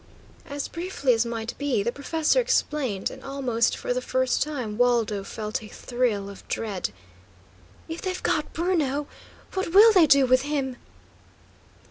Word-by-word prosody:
As 285 0 -3
briefly 335 -7 0
as 230 +1 +1
might 230 0 -4
be, 270 -8 0
the 235 - 0
professor 320 - +1
explained, 270 - 0
and 265 - -11
almost 255 -4 0
for - - -2
the 250 - -2
first 260 0 0
time 255 -8 -2
Waldo 230 -5 +2
felt 215 +2 -4
a 215 - -10
thrill 235 -3 -1
of 200 -1 -11
dread. 200 - -2 1.0
"If 325 +1 -6
they've 370 -1 -4
got - - 0
Bruno, 305 -5 0 0.5
what 380 -3 -2
will 440 +2 +9
they 355 -5 +6
do 275 -1 +6
with 255 0 +4
him?" 275 -3 -2
260 Hz, 150 wpm, -25 LUFS, 230-300 Hz, 1.0 s, will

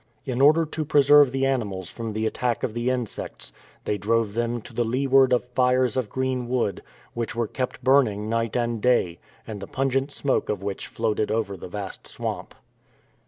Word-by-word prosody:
In 130 -2 -1
order 155 +4 +6
to 155 +1 -4
preserve 145 -2 +6
the 135 +1 0
animals 105 -9 -2
from 115 -2 -5
the 110 +1 -1
attack 120 +1 -1
of 110 - -1
the 120 +2 -1
insects, 125 -4 -4 0.3
they 105 - -1
drove 110 +1 +1
them 120 +1 -1
to - - -11
the 120 - +1
leeward 130 +2 +3
of 125 -1 +2
fires 125 -1 +2
of 125 -5 -1
green 130 -2 -2
wood, 120 -6 0 0.3
which 115 -1 -3
were 120 0 0
kept 125 +3 -4
burning 120 -6 +3
night 115 0 -1
and 120 -2 -1
day, 105 -9 +2 0.3
and 110 -2 -6
the 100 - -6
pungent 135 +1 0
smoke 140 -1 -1
of 100 -2 -2
which 100 -1 -4
floated 110 -2 -1
over 110 -3 -1
the 90 - -9
vast 100 +1 -7
swamp. - - -5
120 Hz, 185 wpm, -25 LUFS, 110-130 Hz, 0.3 s, order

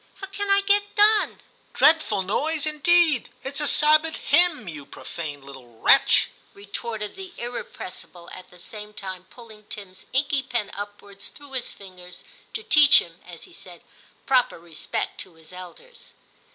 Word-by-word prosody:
* - - -35
How 390 - -6
can 400 +1 -5
I 395 0 +4
get 410 0 +1
done? 420 +1 +3
' - - -36
* - - -36
Dreadful 305 -9 +4
noise, 300 - -1
indeed! 310 -2 +4
it's 275 +2 -3
a 295 - +6
Sabbath 310 +2 +4
hymn, 310 - +3
you 155 -4 -7
profane 145 0 -8
little 130 -4 -13
wretch,* - - +5 0.3
retorted 210 +1 -6
the 380 -1 -10
irrepressible, 185 -7 -8
at 185 0 -11
the 180 - -18
same 210 +4 -10
time 185 -1 -7
pulling 220 -3 -14
Tim's 195 -3 -10
inky 275 +1 0
pen 240 -4 -3
upwards 205 -1 -8
through 285 -1 -16
his 260 -2 -3
fingers, 180 -2 -13 0.3
to 445 - -4
teach 300 -10 +7
him, 170 0 -2
as 175 -2 -10
he 360 - -13
said, - - -11 0.4
proper 260 -2 +2
respect 165 -2 -5
to 180 - -8
his 160 +2 -12
elders. 185 - -13
235 Hz, 165 wpm, -24 LUFS, -, 0.4 s, teach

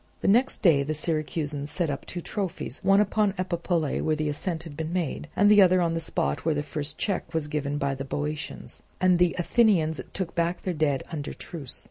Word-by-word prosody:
The - - 0
next 240 +6 +3
day 160 -7 +6
the 155 +2 -2
Syracusans 150 -2 -2
set 165 -1 -1
up 140 - -6
two 175 - -4
trophies, 190 -1 -4
one 195 +1 +5
upon 210 -1 +2
Epipolae 170 -4 -1
where 155 - +1
the 155 -1 -1
ascent 160 +2 -3
had 160 -3 -9
been 160 +1 -4
made, 175 -4 -2
and 205 - +4
the 210 -1 +8
other 185 -1 +6
on 170 -2 +1
the 165 - -1
spot 70 - -1
where 160 -1 +1
the 145 - -1
first 150 +1 -4
check 190 -5 -2
was 160 -2 +1
given 145 -1 -2
by 140 -1 0
the 135 0 -5
Boeotians; 145 +1 -4 0.2
and 180 -1 +4
the 175 -1 +3
Athenians 175 -5 +3
took 185 -3 -4
back 170 +1 -1
their 185 - -1
dead 145 -4 +1
under 150 -3 -4
truce. 145 -7 -5
160 Hz, 210 wpm, -26 LUFS, 150-180 Hz, 0.2 s, the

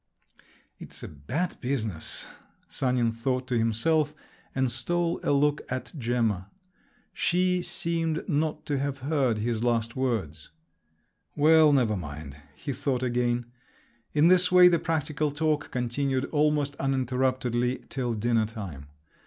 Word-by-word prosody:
"It's - - -8
a - - -5
bad 130 - -4
business!" 110 - -2 0.4
Sanin 125 -3 0
thought 125 +3 -2
to 120 -2 +1
himself, 150 +7 +1 0.4
and 130 -2 +1
stole 170 +8 -1
a - - -2
look 145 +1 +2
at 130 0 -4
Gemma. 115 - -1 0.6
She 180 +1 +1
seemed 165 -2 -2
not 155 -2 -1
to 145 -2 -1
have 140 -1 -3
heard 135 -7 +1
his 115 +1 -1
last 115 -1 0
words. 100 - -2 0.9
"Well, 155 +1 +6
never 120 -6 +3
mind!" 75 -5 -7 0.2
he 140 - -4
thought 130 -1 -1
again. 120 -1 0 0.7
In 150 +2 +4
this 180 0 +5
way 180 0 +8
the 170 -2 +2
practical 155 -2 -1
talk 150 0 -1
continued 130 +2 -1
almost 150 -2 +1
uninterruptedly 130 -2 0
till 125 -4 -2
dinner 115 0 +1
time. 95 - -8
130 Hz, 130 wpm, -27 LUFS, 115-150 Hz, 0.9 s, way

